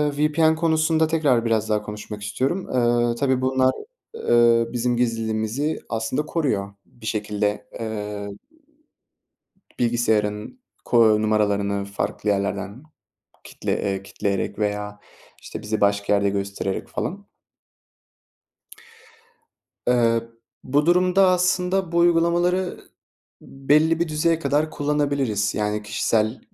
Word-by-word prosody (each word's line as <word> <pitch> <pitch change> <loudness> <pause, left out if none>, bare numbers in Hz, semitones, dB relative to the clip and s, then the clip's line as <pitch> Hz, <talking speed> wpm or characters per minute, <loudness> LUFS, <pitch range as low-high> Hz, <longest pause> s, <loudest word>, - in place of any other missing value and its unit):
eee, - - -11
VPN 160 +1 +3
konusunda 160 0 +2
tekrar 145 -7 +2
biraz 110 -1 0
daha 105 -1 +1
konuşmak 105 0 -8
istiyorum. 130 - -2 0.4
Eee, 115 - -1
tabii 130 +1 +1
bunlar, 130 0 +2 0.4
eee, 120 - +3
bizim 120 0 0
gizliliğimizi 115 +4 -1
aslında 115 +6 -2
koruyor. 105 -12 -1
Bir 115 - -16
şekilde, 105 -1 -2
eee, 105 -2 -4 1.5
bilgisayarın 110 - 0 0.3
ko 110 -3 +4
numaralarını 100 -2 +1
farklı 100 +1 -3
yerlerden 100 +3 -2 0.6
kitle - - -5
eee, 95 -1 -2
kilitleyerek 100 0 -3
veya 105 0 -2 0.4
işte - - -8
bizi 110 0 -3
başka 100 0 +2
yerde 100 0 +2
göstererek 100 -1 -3
falan. 200 +2 -5 2.6
Eee, 115 -2 +3 0.4
bu 145 +4 +1
durumda, 180 +2 +4
aslında 180 0 +1
bu 170 - +1
uygulamaları 175 +2 +2 0.6
belli 155 +4 +1
bir 170 - +1
düzeye 155 +2 +1
kadar 150 +1 0
kullanabiliriz. 140 -9 0
Yani 105 0 -1
kişisel 110 +2 0
115 Hz, 105 wpm, -23 LUFS, 105-155 Hz, 2.6 s, ko